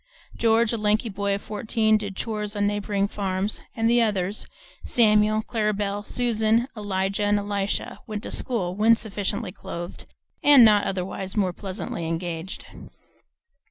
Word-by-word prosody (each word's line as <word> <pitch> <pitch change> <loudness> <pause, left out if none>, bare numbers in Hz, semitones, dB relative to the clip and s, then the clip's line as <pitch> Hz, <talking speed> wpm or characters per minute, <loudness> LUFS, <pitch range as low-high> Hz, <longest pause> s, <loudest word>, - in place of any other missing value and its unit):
George, 230 0 +3
a - - 0
lanky 215 +2 +1
boy 200 0 -1
of 200 - -7
fourteen, 220 +1 +1
did 205 -2 -2
chores 210 -1 -3
on 205 0 +1
neighboring 205 -1 0
farms, 195 0 -2
and 225 0 +1
the 240 +1 +4
others, 205 -2 0 0.4
Samuel, 215 -1 +3
Clara 215 -2 0
Belle, 205 0 -2
Susan, 230 0 +1
Elijah, 200 -1 -1
and 205 0 +3
Elisha, 205 -1 -2
went 210 -1 -5
to - - -6
school, 200 -9 0
when 220 +3 +5
sufficiently 205 -1 -3
clothed 175 -2 -7 0.4
and 285 -5 +8
not 210 -2 +5
otherwise 190 +1 -4
more 185 -3 +1
pleasantly 185 -3 -5
engaged. 165 +2 -4
205 Hz, 145 wpm, -25 LUFS, 195-220 Hz, 0.4 s, and